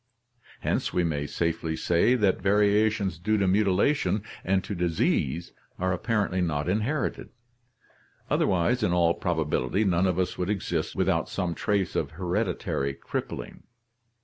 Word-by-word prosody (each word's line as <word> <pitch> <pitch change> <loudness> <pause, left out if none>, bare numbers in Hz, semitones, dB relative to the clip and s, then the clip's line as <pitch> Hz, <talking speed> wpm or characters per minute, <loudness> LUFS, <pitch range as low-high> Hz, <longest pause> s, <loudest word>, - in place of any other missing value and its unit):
Hence - - -1
we 90 - +1
may 75 -3 -1
safely 80 0 -1
say 85 +10 +3
that 100 -6 +2
variations 105 -2 +2
due 110 +4 +1
to 100 -2 +1
mutilation 100 +2 +2 0.2
and 95 0 +1
to - - -5
disease 85 -3 0 0.2
are 95 0 0
apparently 100 -1 0
not 75 -3 -1
inherited, 110 +10 -1 1.0
otherwise 95 +8 +1
in 90 -5 +1
all 85 -1 +3
probability 80 +1 0
none 95 -2 +2
of 90 -2 0
us 95 -1 -1
would 90 +1 -1
exist 90 -5 -2
without - - +1
some 90 -3 -2
trace 100 +1 -1
of - - -1
hereditary 90 -7 -1
crippling. - - -5
90 Hz, 135 wpm, -27 LUFS, 85-105 Hz, 1.0 s, say